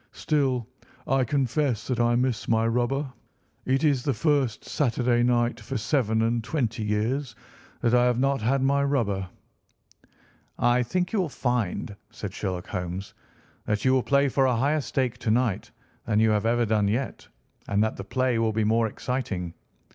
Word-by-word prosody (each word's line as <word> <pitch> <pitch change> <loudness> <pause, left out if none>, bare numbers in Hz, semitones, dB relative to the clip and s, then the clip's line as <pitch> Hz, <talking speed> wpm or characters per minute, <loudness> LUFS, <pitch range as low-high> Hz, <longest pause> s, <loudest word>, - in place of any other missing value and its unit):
"Still, 135 -6 0 0.4
I 135 0 +2
confess 135 -1 0
that 125 -3 -2
I 120 0 +3
miss 125 -1 0
my 115 0 +2
rubber. 125 +4 0 0.5
It 135 +3 +1
is 145 -5 +3
the 135 -1 -1
first 140 -3 0
Saturday 120 -3 +1
night 120 -1 +1
for 125 +4 -4
seven 110 -1 +1
and 115 0 0
twenty 115 -5 -2
years 115 +5 -1 0.5
that 120 - +2
I 125 0 +5
have 125 -1 +2
not 135 0 +1
had 130 +4 +1
my 140 +1 +2
rubber." 105 -10 0 1.3
"I 120 +1 +3
think 180 - -1
you 215 - +2
will 175 - -2
find," 120 -7 -2
said 105 -3 -7
Sherlock 90 -4 -4
Holmes, 90 +1 -5 0.5
"that 105 +1 -1
you 130 - +4
will 130 - +3
play 140 +2 +2
for 135 0 +2
a 125 - +2
higher 145 +6 +1
stake 130 -3 -2
to 120 - -2
night 110 -4 +1 0.4
than 105 -2 +2
you 110 0 +4
have 105 +1 +1
ever 120 0 +2
done 105 -2 +1
yet, 120 +6 -2 0.4
and 100 +1 +2
that 110 - -1
the - - -5
play 125 +3 0
will 110 -1 +1
be 110 +1 +1
more 115 +1 +2
exciting. 105 -8 -4
120 Hz, 175 wpm, -26 LUFS, 110-135 Hz, 1.3 s, I